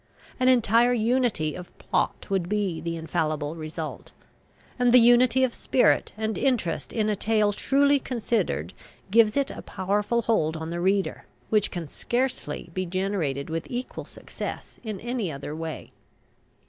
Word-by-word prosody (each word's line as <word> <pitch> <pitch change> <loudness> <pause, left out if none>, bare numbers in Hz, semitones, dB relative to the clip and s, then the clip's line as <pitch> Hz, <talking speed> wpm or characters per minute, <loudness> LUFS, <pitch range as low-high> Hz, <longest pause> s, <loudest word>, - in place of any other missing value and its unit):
An 255 - +3
entire 240 -1 +4
unity 230 - +1
of 180 -1 -10
plot - - -1
would 185 -3 0
be 200 -6 -1
the 165 0 -3
infallible 155 -2 -2
result; 155 -1 -6 0.7
and 245 -1 +4
the 250 - +8
unity 245 +2 +5
of 250 -2 +1
spirit 255 - +2
and 220 0 -2
interest 245 -11 0
in 215 -2 0
a 210 - +1
tale 210 0 +2
truly 280 +5 +3
considered 215 - -1 0.4
gives 220 +2 +5
it 280 -1 +1
a - - -7
powerful 205 +5 -1
hold 165 -9 +1
on 160 +1 -5
the 170 - -3
reader, 195 +1 0 0.2
which 210 -2 +3
can 175 -4 -5
scarcely 240 - -2
be 185 - -1
generated 180 -7 -2
with 165 0 -3
equal 250 +1 -5
success - - -7
in 215 -4 -5
any 235 -7 -2
other 145 +1 -6
way. 160 -1 -6
205 Hz, 150 wpm, -26 LUFS, 165-240 Hz, 0.7 s, the